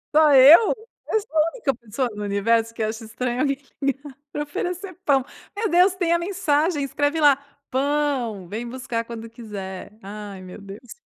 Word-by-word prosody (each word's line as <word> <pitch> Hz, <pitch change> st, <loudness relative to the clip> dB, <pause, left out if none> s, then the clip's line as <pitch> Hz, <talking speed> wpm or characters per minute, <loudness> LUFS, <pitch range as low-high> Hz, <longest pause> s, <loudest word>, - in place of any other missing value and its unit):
Só 310 Hz, -1 st, +6 dB
eu? 285 Hz, -, +8 dB, 0.4 s
Eu 440 Hz, -, +3 dB
sou 320 Hz, -7 st, -7 dB
a 310 Hz, +2 st, +4 dB
única 295 Hz, -, -1 dB
pessoa 240 Hz, +2 st, -3 dB
no 210 Hz, -, -5 dB
universo 225 Hz, +3 st, +1 dB
que 225 Hz, -, -3 dB
acha 220 Hz, +1 st, -3 dB
estranho 240 Hz, +2 st, -3 dB
alguém 275 Hz, -2 st, +1 dB, 0.2 s
ligar 275 Hz, 0 st, -2 dB, 0.2 s
pra 295 Hz, -, -2 dB
oferecer 360 Hz, +5 st, -4 dB
pão? 270 Hz, -3 st, +3 dB, 0.3 s
Meu 440 Hz, +1 st, 0 dB
Deus, 360 Hz, +2 st, +4 dB
tem 345 Hz, -2 st, +1 dB
a 340 Hz, -, +2 dB
mensagem, 335 Hz, -4 st, 0 dB
escreve 290 Hz, +3 st, 0 dB
lá: 290 Hz, -2 st, +6 dB, 0.4 s
"Pão, 265 Hz, -8 st, 0 dB
vem 225 Hz, +5 st, -5 dB
buscar 245 Hz, -2 st, -3 dB
quando 230 Hz, -1 st, -7 dB
quiser". 205 Hz, -5 st, -8 dB
Ai 200 Hz, -1 st, -8 dB
meu 185 Hz, +2 st, -10 dB
Deus. 200 Hz, +5 st, -10 dB
265 Hz, 175 wpm, -23 LUFS, 225-305 Hz, 0.4 s, eu